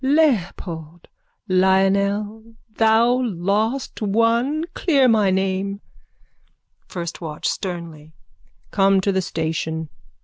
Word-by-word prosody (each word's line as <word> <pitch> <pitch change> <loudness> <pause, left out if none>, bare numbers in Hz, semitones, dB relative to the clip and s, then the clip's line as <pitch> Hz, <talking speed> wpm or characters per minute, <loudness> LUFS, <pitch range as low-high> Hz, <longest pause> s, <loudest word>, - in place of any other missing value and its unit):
Leopold! 180 - 0 0.4
Lionel, 200 +4 +1 0.2
thou 230 +3 +3
lost 215 +5 -1
one! 230 +9 +1
Clear 280 -7 +3
my 215 -4 +3
name. 190 +1 -1 1.1
FIRST 170 -1 -6
WATCH: 155 -3 -4
(Sternly.) 170 -5 -5 0.6
Come 195 -1 +3
to 200 - +1
the 190 0 +1
station. 160 -1 -3
195 Hz, 90 wpm, -21 LUFS, 175-230 Hz, 1.1 s, thou